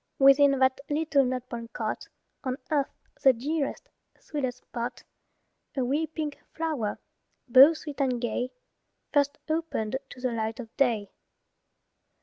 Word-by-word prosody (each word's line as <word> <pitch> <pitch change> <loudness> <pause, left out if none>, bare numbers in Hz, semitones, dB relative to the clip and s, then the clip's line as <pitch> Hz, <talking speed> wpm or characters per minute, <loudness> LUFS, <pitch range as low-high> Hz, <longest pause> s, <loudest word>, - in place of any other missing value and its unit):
Within 275 0 +6
that 260 0 +3
little 295 -2 +3
nut 255 -1 -2
brown 235 -2 -6
cot, - - -3 0.4
On 260 -1 -2
earth 285 -3 +2 0.3
the 265 - +7
dearest, 290 - -2 0.3
sweetest 260 -5 -3
spot, 240 0 -5 0.7
A 260 - +2
wee 295 +5 +1
pink 310 -2 -4 0.2
flower, 305 -10 -1 0.5
both 270 +6 +8
sweet 295 -2 -6
and 255 -3 +1
gay, 245 +1 -1 0.6
First 285 -1 +3
opened 315 -8 -1
to - - -11
the 250 -1 -1
light 225 0 -2
of 230 -3 -9
day. 230 -7 +1
265 Hz, 135 wpm, -28 LUFS, 245-295 Hz, 0.7 s, both